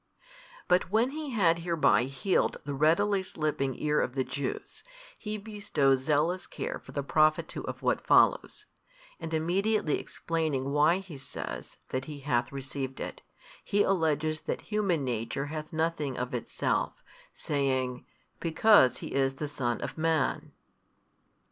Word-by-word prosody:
But 180 -1 +3
when 225 +6 +2
He 305 0 -5
had 175 -9 +3
hereby 165 -7 +3
healed 135 +8 0
the 145 - -4
readily 170 +8 +3
slipping 150 -7 -2
ear 150 0 +2
of 125 - -2
the 130 - +1
Jews, 140 0 -5 0.3
He 215 -1 -5
bestows 200 -11 +1
zealous 155 +6 +1
care - - -4
for - - -13
the 140 - -2
profit 155 +2 +3
too - - -6
of - - -6
what - - +1
follows, - - +4 0.5
and 165 -2 -6
immediately 175 +3 +1
explaining 155 -5 -2
why 150 +4 +4
He 185 -7 -9
says 135 - -7
that 130 +1 -2
He 150 -2 -8
hath 125 -3 0
received 135 -1 -5
it, - - -6 0.4
He 205 0 +2
alleges 155 -4 +1
that - - -3
human 190 -8 +1
nature 120 +3 -2
hath 155 +1 -5
nothing 160 -4 -1
of 125 0 -3
itself, 120 - -2 0.3
saying, 130 -3 -1 0.4
Because 165 - +5
He - - -6
is 135 -1 +1
the 150 +2 -3
Son 125 -5 -2
of - - -5
Man. 160 -4 0
155 Hz, 145 wpm, -29 LUFS, 135-180 Hz, 0.5 s, Because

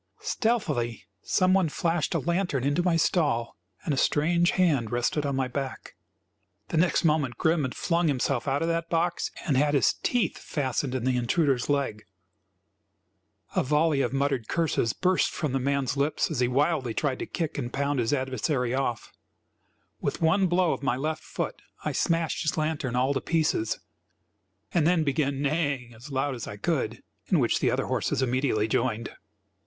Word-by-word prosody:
Stealthily 155 - -1 0.2
some 185 0 +2
one 190 -4 +3
flashed 165 0 -1
a - - +2
lantern 170 -6 0
into 145 +5 +1
my 175 -1 +2
stall 145 -8 +1 0.3
and 150 - 0
a - - -1
strange 170 +6 +2
hand 145 - +2
rested 120 +5 0
on 140 - -1
my 130 -1 0
back. 135 +1 -5 0.8
The 165 - -1
next 170 +1 +2
moment 150 -7 +1
Grim 160 0 +2
had 130 -3 -3
flung 170 -1 +1
himself 135 -2 0
out 140 +3 +1
of - - 0
that 165 0 -1
box 170 +1 0 0.2
and 145 - +1
had 145 +2 +3
his 130 -8 +4
teeth 245 -2 0
fastened 135 -2 -2
in 125 - -2
the 130 0 +1
intruder's 130 +1 +1
leg. 140 -7 -1 1.5
A - - +3
volley 150 +1 +2
of - - 0
muttered 135 -4 0
curses 160 -9 +1
burst 185 +6 +2
from 155 -4 -3
the 135 - 0
man's 140 0 0
lips 140 +2 0
as - - -2
he 125 - +3
wildly 135 -2 +1
tried 140 -4 -1
to - - -4
kick 160 -4 -3
and 120 -2 -4
pound 140 +1 0
his 115 -2 +1
adversary 130 -1 0
off. 130 -4 -2 0.9
With - - -2
one 185 +4 +3
blow 175 -1 +2
of - - -5
my 135 -3 +1
left 155 +4 -3
foot - - -4 0.2
I - - 0
smashed 165 -1 0
his 155 0 -1
lantern 155 -5 -1
all 130 +3 +2
to 135 - -1
pieces, 155 -9 0 0.9
and 160 -3 +3
then 175 -2 +3
began 140 -1 0
neighing 140 -5 -1
as 120 +6 -12
loud 135 +1 0
as 120 -3 -6
I 105 - -7
could, 100 - -2 0.2
in - - +3
which - - +2
the - - +2
other - - 0
horses - - 0
immediately 125 -4 +1
joined. 115 0 -1
140 Hz, 180 wpm, -27 LUFS, 130-165 Hz, 1.5 s, his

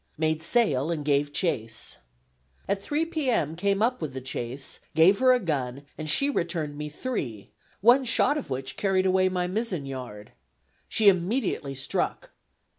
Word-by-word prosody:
Made 155 0 0
sail 160 - +2
and 155 -4 -2
gave 145 0 +2
chase. 115 - -3 0.7
At 200 0 0
3 295 +9 -1
p. 315 -5 -1
m. 160 - +1
came 200 +3 +1
up 250 -1 +1
with 145 -4 -4
the - - -3
chase, 130 +1 -5 0.2
gave 175 +5 +5
her 255 0 +5
a 250 - +4
gun 140 - -3
and 155 -1 -4
she 275 - +4
returned 170 - -2
me 150 +1 -5
three, 140 - -5 0.3
one 245 +6 +6
shot 255 +4 +3
of 295 - -4
which 130 0 -4
carried 190 -2 +1
away 185 0 +3
my 180 -1 -1
mizzen 185 -5 -1
yard. 125 -6 -7 0.6
She 215 - +2
immediately 185 - +1
struck. 135 - -3
170 Hz, 165 wpm, -26 LUFS, 140-215 Hz, 0.7 s, one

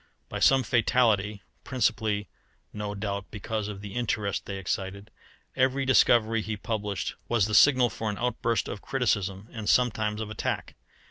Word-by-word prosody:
By - - -4
some 135 -1 +5
fatality, 110 -4 +2 0.2
principally 110 -5 0 0.5
no 105 -1 -4
doubt 100 -1 -4
because 110 0 -4
of 100 -2 -7
the 100 -1 -8
interest 105 -4 -2
they 100 - -4
excited, 95 +2 -4 0.4
every 130 +1 +2
discovery 115 -3 +4
he 110 0 -4
published 105 -3 -3
was 115 -5 +2
the 105 - -3
signal 125 0 +6
for 110 0 -3
an 105 - -4
outburst 115 -2 0
of 100 - -6
criticism 105 -6 -1
and 110 -3 -4
sometimes 110 -3 +2
of 110 -1 -5
attack. 110 - -3
110 Hz, 150 wpm, -27 LUFS, 100-120 Hz, 0.5 s, signal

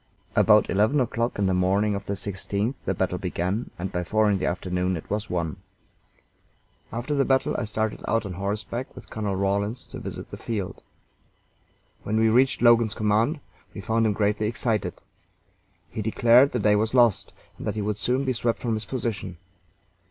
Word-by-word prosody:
About - - +5
eleven 110 +9 +2
o'clock 120 -1 -1
in 100 - +1
the 95 - +2
morning 95 +3 +2
of 100 0 -5
the 100 - -1
16th 100 +4 -2
the - - 0
battle - - -1
began, 95 +7 -2
and 95 +2 -4
by 90 -1 -2
four 110 +3 +2
in 100 - +1
the - - -1
afternoon 90 0 -1
it 80 - -9
was 105 +1 -2
won. 85 0 -2 1.3
After 120 +6 -3
the 140 -1 +3
battle 130 0 +1
I 115 - -1
started 110 0 -2
out 115 0 +1
on 95 - -5
horseback 105 +6 -4
with 125 - -12
Colonel 105 -3 -2
Rawlins 100 +4 -1
to - - -6
visit - - -7
the - - -6
field. 105 -5 -4 1.2
When 110 +1 -1
we 110 0 +4
reached 130 +3 +3
Logan's 115 -2 +5
command 110 +7 +1 0.3
we 100 - -5
found 115 +2 +1
him 105 - +1
greatly 105 +1 +1
excited. 115 -1 -1 1.0
He 110 - -4
declared 120 +5 +5
the - - -1
day 105 0 +4
was 110 +4 0
lost, 120 -5 +4 0.3
and - - -5
that - - -1
he 110 - -2
would 105 0 -1
soon 125 +6 0
be 130 - +1
swept 115 -1 0
from 120 -2 -1
his 110 -1 -3
position. 105 -7 -4
110 Hz, 185 wpm, -25 LUFS, 100-115 Hz, 1.3 s, About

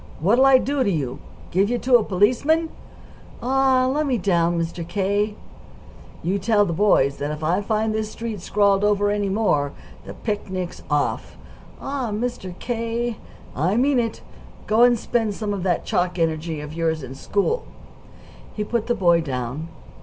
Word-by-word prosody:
What'll 235 - +4
I 270 -1 +7
do 275 +1 0
to 205 - +1
you? 140 -9 -2 0.3
Give 195 +3 +2
you 245 - +1
to 245 0 +5
a 225 - -1
policeman?" 255 - +2 0.7
"Aw, 260 0 +3
lemme 270 -1 +1
down, 175 -3 +1
Mr. 165 0 -4
K." 205 +3 0 0.9
"You 190 +3 0
tell 205 +1 +3
the 170 - -2
boys 160 -7 +3
that 145 - -3
if 150 +1 -5
I 175 +5 +1
find 215 +1 0
this 215 0 -2
street 225 -4 -5
scrawled 200 +1 +2
over 205 0 +2
any 205 -1 0
more, 170 -9 +1 0.3
the - - -7
picnic's 190 -4 -4
off." 145 0 -1 0.4
"Aw, 270 -4 -3
Mr. 210 -4 -4
K.!" 230 -1 -2 0.4
"I 180 +9 +1
mean 265 +1 +3
it. 230 -2 -3 0.4
Go 220 +2 +2
and 245 0 +6
spend 225 -2 -1
some 210 -1 -3
of 200 - -3
that 175 -2 0
chalk 180 0 0
energy 160 -1 -1
of 150 +1 -8
yours 160 -2 -1
in 130 0 -7
school." 205 - -1 0.9
He 210 - -1
put 230 +1 -2
the 240 - +1
boy 175 -5 +3
down. 130 +1 -4
205 Hz, 165 wpm, -22 LUFS, 170-235 Hz, 0.9 s, I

